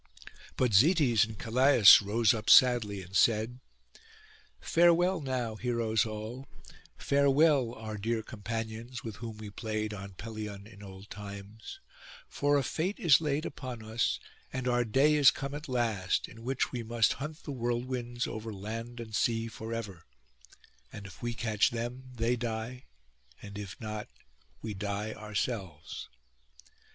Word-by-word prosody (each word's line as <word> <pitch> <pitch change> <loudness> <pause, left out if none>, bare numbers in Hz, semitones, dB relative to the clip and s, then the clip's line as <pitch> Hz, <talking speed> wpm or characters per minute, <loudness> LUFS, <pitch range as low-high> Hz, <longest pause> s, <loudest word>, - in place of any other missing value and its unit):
But 125 -4 +1
Zetes 125 - +5
and 110 -1 -9
Calais 125 +2 +2 0.2
rose 105 +2 +3
up 110 -2 -3
sadly 110 -6 +5
and 90 +2 -11
said, 115 +3 +2 1.0
'Farewell 175 +1 +3
now, 125 -5 -3
heroes 115 -2 0
all; 110 +5 -7 0.5
farewell, 140 -3 +3
our 110 -2 -6
dear 110 +2 -1
companions, 115 +2 -6
with 110 -3 -6
whom 115 -1 -7
we 105 -1 -8
played 110 0 -3
on 100 -1 -8
Pelion 105 -1 -7
in 105 -2 -14
old 95 0 -11
times; 100 - -9 0.5
for 145 0 +1
a 140 - +1
fate 175 +10 -2
is 160 -3 +5
laid 150 0 -1
upon 125 -4 -6
us, 110 +1 0 0.3
and 130 -1 -3
our 120 -1 +2
day 135 +7 +3
is 145 -3 +7
come 140 0 -4
at 150 0 -7
last, 110 -7 0
in 115 0 -13
which 130 +2 -1
we 125 - -3
must 115 0 +2
hunt 150 +2 -6
the 145 - -6
whirlwinds 120 -1 -2
over 110 +1 -5
land 115 +4 -6
and 110 -2 -6
sea 115 +1 +1
for 115 0 -8
ever; 105 -7 -6 0.8
and 100 - -9
if 95 - -12
we 120 -1 -3
catch 110 -3 +2
them 120 +2 -5
they 115 +1 +1
die, 120 +1 -5 0.5
and 100 -1 -10
if 100 -4 -7
not, 110 -1 -5 0.6
we 110 -2 -4
die 105 +2 -3
ourselves. 105 -6 -4
115 Hz, 145 wpm, -30 LUFS, 105-125 Hz, 1.0 s, is